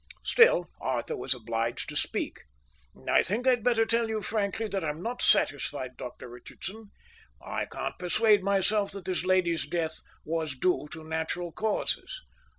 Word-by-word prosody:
Still 180 - +5
Arthur 125 -3 -1
was 130 +1 -1
obliged 115 0 -2
to - - -7
speak. - - -2 0.7
"I - - +5
think 225 +7 -1
I'd 250 -4 +4
better 230 -2 +4
tell 230 0 +1
you 220 -1 -1
frankly 215 +1 0
that 195 -3 -1
I'm 155 +1 -3
not 245 +2 -3
satisfied, 135 -2 +2
Dr 125 0 -8
Richardson. 190 - -9 0.5
I - - -3
can't - - -5
persuade 205 +3 +4
myself 200 +1 +2
that 195 -3 -7
this 185 -1 -1
lady's 180 -4 +2
death 160 0 -2 0.3
was 160 -3 -2
due 180 +1 +1
to 160 0 -8
natural 160 +2 -3
causes." 220 - -1
180 Hz, 155 wpm, -29 LUFS, 150-215 Hz, 0.7 s, Still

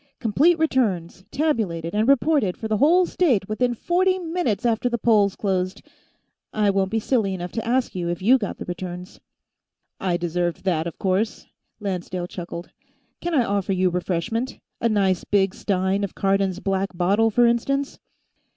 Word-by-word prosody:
Complete 285 +10 +3
returns 205 - 0
tabulated 210 - -1
and 215 +2 +1
reported 275 - +3
for 220 - -4
the 215 -1 0
whole 345 - +5
state 255 - +1
within 240 +3 0
forty 370 +8 +1
minutes 325 - -2
after 235 +1 +1
the 240 - -1
polls 210 -4 +3
closed. 190 0 -2 0.7
I 210 -2 +2
won't 195 -1 +1
be 225 +2 0
silly 215 -5 0
enough 175 -1 -6
to 225 0 -4
ask 250 +1 +1
you 175 -2 -3
if 175 0 -2
you 245 +8 +4
got 205 - -4
the - - -7
returns." 180 0 -7 0.8
"I 180 -2 0
deserved 175 0 -2
that, 170 -4 0
of 170 - -7
course," 195 +4 -1 0.3
Lancedale 185 -3 -3
chuckled. 175 -1 -7 0.5
"Can 345 -1 -2
I 255 - +4
offer 200 -2 0
you 185 -1 +2
refreshment? 190 +8 -2 0.2
A 230 - +1
nice 195 -4 +1
big 195 -2 +1
stein 190 0 0
of 200 - -4
Cardon's 195 -1 +1
Black 195 -2 -2
Bottle, 200 +6 +3
for 240 +3 +4
instance?" 275 +4 0
200 Hz, 165 wpm, -23 LUFS, 185-240 Hz, 0.8 s, whole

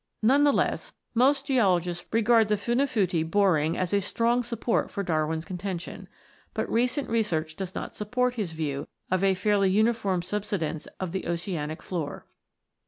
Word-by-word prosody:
None 270 +6 +5
the 290 - +6
less, - - -1 0.2
most 270 +4 +3
geologists 180 - +1
regard 225 0 +4
tne 210 - +3
Funafuti 210 - +1
boring 165 -5 +2
as 185 +1 -1
a 200 - +3
strong 235 +5 +1
support 235 -1 -1
for 200 - -3
Darwin's 160 -1 -1
contention; 185 -1 -5 0.5
but - - -1
recent 250 +4 +1
research 165 -9 0
does 190 0 -6
not - - -5
support 245 +4 0
his 205 -9 -3
view 145 -3 -3 0.2
of 185 0 +2
a 195 -1 +4
fairly 200 +1 +2
uniform 205 -3 +2
subsidence 190 -5 -3
of 185 -3 -3
the 190 - -3
oceanic 170 -3 -3
floor. 160 -6 -4
195 Hz, 155 wpm, -27 LUFS, 170-230 Hz, 0.5 s, the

